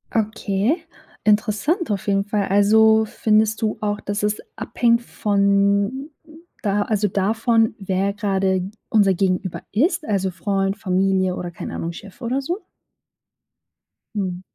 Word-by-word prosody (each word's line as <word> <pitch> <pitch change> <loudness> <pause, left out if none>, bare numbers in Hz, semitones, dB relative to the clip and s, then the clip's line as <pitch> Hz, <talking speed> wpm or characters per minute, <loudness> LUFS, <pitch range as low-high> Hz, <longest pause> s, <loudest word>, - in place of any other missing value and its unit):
Okay, 220 - 0 0.4
interessant 215 - +1
auf 200 0 -3
jeden 195 0 +2
Fall. 205 -1 -1
Also, 220 +2 +5
findest 220 +1 +1
du 215 -1 0
auch, 210 0 -1
dass 205 +1 -3
es 210 0 +1 0.2
abhängt 235 -1 +1
von 200 +6 +1 0.5
da 205 0 +1
also, 210 0 +1
davon, 225 +3 +1
wer 195 +1 -1
grade 190 -2 0 0.2
unser 200 -3 +4
Gegenüber 185 0 -1
ist, 315 - +1
also, 195 -2 0
Freund, 195 +2 -1
Familie 190 -1 +1
oder 175 -1 -5
keine - - -7
Ahnung, 170 - -3
Chef 195 +2 -12
oder 255 +4 -1
so? 350 +9 -3 1.6
Mhm. 185 -3 -2
205 Hz, 130 wpm, -21 LUFS, 195-220 Hz, 1.6 s, Also